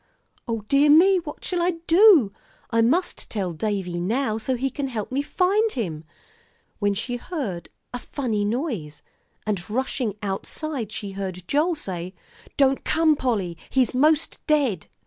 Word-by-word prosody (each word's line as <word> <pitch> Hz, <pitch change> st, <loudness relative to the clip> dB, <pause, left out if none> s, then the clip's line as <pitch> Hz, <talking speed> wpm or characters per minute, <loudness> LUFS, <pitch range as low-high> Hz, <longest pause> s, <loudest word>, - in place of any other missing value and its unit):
"O 225 Hz, -2 st, -2 dB
dear 275 Hz, +7 st, +3 dB
me, 365 Hz, +6 st, +7 dB
what 310 Hz, -4 st, -8 dB
shall 360 Hz, -2 st, -1 dB
I 355 Hz, +1 st, +2 dB
do? 335 Hz, -, +6 dB, 0.4 s
I 230 Hz, -, +3 dB
must 330 Hz, +11 st, +1 dB
tell 190 Hz, -5 st, -2 dB
Davie 185 Hz, -1 st, -2 dB
now, 220 Hz, +4 st, 0 dB
so 255 Hz, +4 st, -1 dB
he 265 Hz, +2 st, -1 dB
can 280 Hz, +1 st, -3 dB
help 225 Hz, -4 st, -4 dB
me 270 Hz, +2 st, +1 dB
find 395 Hz, +8 st, +1 dB
him 165 Hz, -, -4 dB, 0.4 s
" -, -, -39 dB
when 205 Hz, -1 st, +1 dB
she 245 Hz, +4 st, -3 dB
heard 230 Hz, -, -5 dB, 0.2 s
a 245 Hz, -, -3 dB
funny 235 Hz, -6 st, -2 dB
noise, 210 Hz, -, -3 dB, 0.4 s
and 200 Hz, -4 st, -2 dB
rushing 245 Hz, -2 st, -1 dB
outside, 225 Hz, +5 st, -4 dB
she 200 Hz, -2 st, -5 dB
heard 185 Hz, -2 st, -6 dB
Joel 320 Hz, +4 st, +2 dB
say, 185 Hz, -, -6 dB, 0.4 s
"Don't 270 Hz, -1 st, +3 dB
come, 320 Hz, -1 st, +3 dB
Polly, 210 Hz, -11 st, -1 dB
he's 260 Hz, -2 st, +2 dB
'most 300 Hz, +4 st, +2 dB
dead." 275 Hz, -, +1 dB
245 Hz, 155 wpm, -24 LUFS, 200-295 Hz, 0.4 s, me